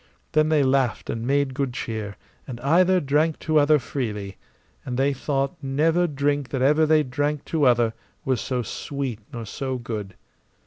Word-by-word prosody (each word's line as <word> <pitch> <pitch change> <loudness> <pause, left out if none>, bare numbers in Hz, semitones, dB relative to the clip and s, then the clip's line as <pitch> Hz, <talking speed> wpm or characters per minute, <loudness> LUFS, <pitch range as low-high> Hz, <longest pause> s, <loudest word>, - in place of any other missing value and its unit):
Then 155 0 +3
they 155 -2 +3
laughed 130 -2 +1
and 115 +1 -4
made 140 -1 +1
good 135 -2 -2
cheer, 110 -3 -4 0.3
and 120 -3 -6
either 180 +7 +4
drank 150 +2 +1
to 155 -1 +3
other 150 +1 +5
freely, 105 -7 -4 0.5
and 125 -2 -4
they 140 +2 +2
thought 135 +4 -1
never 160 +6 +2
drink 145 -2 -1
that 130 -2 -1
ever 150 +3 +4
they 155 0 +4
drank 145 +2 -2
to 155 -3 +3
other 120 -3 +3 0.3
was 130 -3 0
so 125 -2 -2
sweet 135 0 -4
nor 115 -2 -6
so 130 +4 -4
good. 110 -5 -6
135 Hz, 170 wpm, -24 LUFS, 125-150 Hz, 0.5 s, other